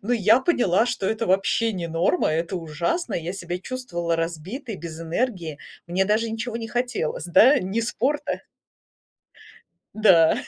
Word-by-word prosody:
Но 235 +5 -1
я 225 +2 +4
поняла, 240 - +2
что 240 -6 -2
это 225 +1 -1
вообще 195 +4 +2
не 175 -3 -4
норма, 165 +2 +1
это 165 +3 -1
ужасно. 170 - -2
Я 170 +2 -3
себя 180 -2 -5
чувствовала 175 -10 -3
разбитой, 180 - -4
без 165 -1 -8
энергии. 165 - -2 0.3
Мне 185 +3 +1
даже 215 +3 +1
ничего 225 +1 -4
не 225 -1 -5
хотелось, 240 -10 -2
да, 250 - +6
ни 190 +5 -3
спорта 285 +6 -1 1.5
Да. 185 -7 +5
195 Hz, 145 wpm, -24 LUFS, 170-235 Hz, 1.5 s, да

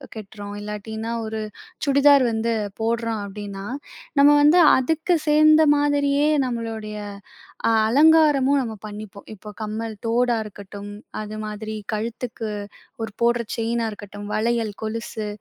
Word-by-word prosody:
கட்றோம். 205 -1 -8
இல்லாட்டினா, 220 +2 -5
ஒரு 220 0 -4 0.4
சுடிதார் 280 -1 +5
வந்து 225 +1 0 0.3
போடுறோம். 230 -1 -1
அப்டின்னா, 200 -1 -7 0.5
நம்ம 285 +1 +8
வந்து 305 +5 +6 0.2
அதுக்கு 320 +7 +1
சேர்ந்த 310 +1 +6
மாதிரியே 290 0 +2 0.2
நம்மளுடைய 225 -3 -5 0.9
அலங்காரமும் 290 0 +5
நம்ம 230 -3 -4
பண்ணிப்போம். 205 -1 -10
இப்போ, 210 +1 -11
கம்மல், 220 +1 -4
தோடா 240 +1 +2
இருக்கட்டும் 205 0 -9 0.3
அது 215 0 -6
மாதிரி 215 +1 -6 0.2
கழுத்துக்கு 225 +1 -4 0.5
ஒரு 225 -2 -4
போடுற 235 0 +2
செயினா 230 0 -1
இருக்கட்டும், 205 0 -9
வளையல், 225 -1 0
கொலுசு, 220 -1 -4
225 Hz, 115 wpm, -23 LUFS, 215-265 Hz, 0.9 s, நம்ம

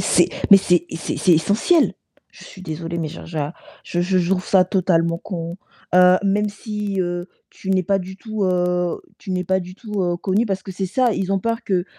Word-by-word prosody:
c'est - - +3 0.2
mais 200 - +11
c'est 175 -2 +2
c'est 165 - -3
c'est 165 +5 +3
essentiel. 205 - +3 0.4
Je - - -14
suis 185 - -12
désolée, 165 0 -5
mais 160 -2 -2
je 165 - -9
je 165 -1 -6 0.5
je 175 - -2
je 185 +1 +1
je 175 0 0
trouve 185 -1 +1
ça 185 -2 +5
totalement 170 -3 +1
con, 170 -2 -5 0.4
heu, 180 0 +7
même 205 +1 +2
si 210 -1 -5
heu, 175 0 -3 0.2
tu 190 - -7
n'es 185 -1 +3
pas 195 +2 +2
du 190 +1 -8
tout, 215 -1 -3
heu, 180 -1 0 0.2
tu - - -9
n'es 180 -1 -1
pas 190 +2 +1
du 180 +1 -9
tout, 210 -1 -5
heu, 175 -1 0
connu 195 +6 0
parce 195 -2 -2
que 190 - -7
c'est 190 +1 -3
ça, 235 +5 +2
ils 195 -1 -1
ont 195 - +2
peur 230 +4 -2
que 185 -3 0
185 Hz, 220 wpm, -21 LUFS, 175-200 Hz, 0.5 s, mais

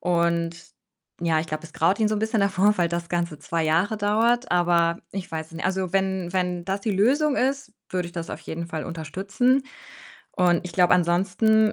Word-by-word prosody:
Und 170 -1 +1 0.6
ja, 165 -2 +2
ich 165 - -5
glaube, 155 +1 -4
es 165 - -12
graut 185 +7 +2
ihn 215 - +3
so 215 - 0
'n - - -1
bisschen 220 0 0
davor, 200 +1 +3
weil 170 -1 +2
das 170 0 -3
Ganze 170 -3 -2
2 165 +2 -2
Jahre 170 +7 +1
dauert, 230 +4 +1
aber 170 -1 +2
ich 195 -2 -5
weiß 160 -1 -4
es - - -20
ni 165 - -7
also, 185 -1 -1
wenn 190 -2 0
wenn 180 -2 -1
das 195 +2 -3
die 220 - -1
Lösung 275 +9 +2
ist, 270 -3 -1 0.2
würde 180 -1 -1
ich - - -15
das 170 -1 -5
auf - - -6
jeden 165 +2 -6
Fall 160 -2 -5
unterstützen 195 - 0 0.7
und 175 -1 +3
ich 180 - -7
glaube, 180 -1 +4
ansonsten 195 +5 +3
180 Hz, 205 wpm, -24 LUFS, 170-205 Hz, 0.7 s, glaube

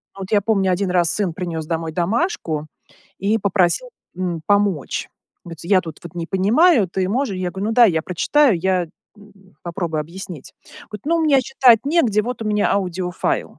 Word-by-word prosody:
Но, 195 - -11
вот, 190 - -7
я 205 - +4
помню, 195 -2 +1
1 185 +1 -1
раз, 175 -2 +2
сын 200 -5 -1
принес 165 -2 -5
домой 165 -1 -3
домашку 175 - -1 0.5
и 210 +3 +1
попросил, 200 - +1 0.3
м, 175 -3 -3
помочь. 200 -7 0 0.4
Говорится, 165 0 -9
я 190 -2 +5
тут, 160 -4 -10
вот, 170 -1 -10
не 170 -1 -4
понимаю, 215 - +3
ты 185 +1 -2
можешь? 235 -2 -1
Я 185 -1 -3
говорю: 195 +4 -4
"Ну - - 0
дай, 235 -2 +6
я 160 - 0
прочитаю 225 - +2
я, 180 -1 0 0.3
м, 200 -2 -20
попробую 170 -3 -3
объяснить". 170 -2 -9 0.4
Говорит: 210 +1 -9
"Ну 335 +1 +2
мне 295 -4 +4
читать 250 -3 +4
негде, 265 -9 +2
вот, 235 0 -5
у - - -6
меня 210 -1 +1
аудиофайл". 180 -2 -2
190 Hz, 180 wpm, -20 LUFS, 175-215 Hz, 0.5 s, дай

